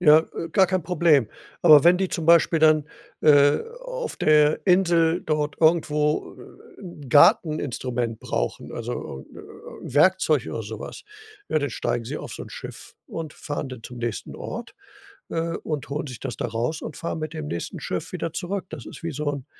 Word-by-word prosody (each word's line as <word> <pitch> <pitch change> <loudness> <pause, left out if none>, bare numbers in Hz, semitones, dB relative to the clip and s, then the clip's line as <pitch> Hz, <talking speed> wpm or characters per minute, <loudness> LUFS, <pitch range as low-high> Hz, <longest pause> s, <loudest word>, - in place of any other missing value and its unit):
Ja, 155 -3 +7 0.2
äh, 165 - -4
gar 190 -2 +4
kein 185 -1 -1
Problem, 160 - +3 0.3
aber 155 -4 +8
wenn 175 +1 +7
die 190 0 -1
zum 165 -3 -4
Beispiel 170 0 +5
dann, 155 -1 +4 0.3
äh, 145 -1 +5 0.2
auf - - -5
der 150 0 +4
Insel 170 -3 +3
dort 150 -1 -1
irgendwo, 150 -2 +2
äh, - - -16
'n 155 -7 -10
Garteninstrument 125 -6 +3
brauchen, - - -3
also, 65 - -5
äh, - - -12 0.5
'n 130 - -9
Werkzeug 155 -4 +3
oder 115 - -4
so 110 +1 -7
was, - - -8 0.4
ja, 155 - +2
dann 145 - -2
steigen 115 - -2
sie - - -5
auf - - -8
so - - -7
'n - - -11
Schiff - - -10
und 160 -2 -6
fahren 145 -1 -5
dann 125 -3 -9
zum 125 -1 -9
nächsten 120 -2 -4
Ort, - - -7 0.6
äh, 165 0 -2
und 150 -5 -5
holen 145 +1 -3
sich 125 -4 -8
das 130 -4 -5
da - - -2
raus 120 +8 -2
und 150 - -7
fahren 165 -1 -4
mit 155 +1 -5
dem 155 -2 -5
nächsten 85 - -5
Schiff - - -4
wieder 165 - -3
zurück. 190 +2 -3
Das 145 -8 -8
ist - - -11
wie 165 - -2
so 150 +1 -2
'n, 140 -2 -5
150 Hz, 190 wpm, -24 LUFS, 140-165 Hz, 0.6 s, aber